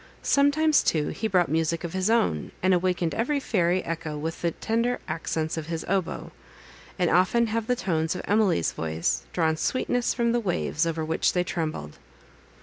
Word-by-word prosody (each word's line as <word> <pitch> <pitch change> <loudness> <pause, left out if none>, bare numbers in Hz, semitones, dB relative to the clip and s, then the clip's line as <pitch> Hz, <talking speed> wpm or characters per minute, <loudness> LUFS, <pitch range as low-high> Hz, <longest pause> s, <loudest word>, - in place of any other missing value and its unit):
Sometimes, 285 +2 +4
too, 150 -2 +1
he 220 - -2
brought 180 -4 +3
music 165 +1 0
of 170 - -5
his 190 +2 0
own, 85 - +1
and 185 0 +4
awakened 180 -2 +1
every 280 +6 0
fairy 185 -7 +1
echo 160 -2 -4
with 160 +2 -4
the 170 - +2
tender 230 +7 -1
accents 160 0 -2
of 155 -1 -4
his 165 -1 -4
oboe; 190 -2 -2 0.7
and 180 -3 +1
often 185 +7 +3
have 225 0 -2
the 250 - +2
tones 165 -6 -1
of 180 - -5
Emily's 200 - +2
voice 80 0 -2
drawn 160 -2 +1
sweetness 245 +6 0
from 235 -1 +1
the 240 - +2
waves, 175 -5 -1
over 160 -1 -2
which 160 +1 +1
they 180 - +2
trembled. 155 - -4
180 Hz, 175 wpm, -26 LUFS, 160-225 Hz, 0.7 s, Sometimes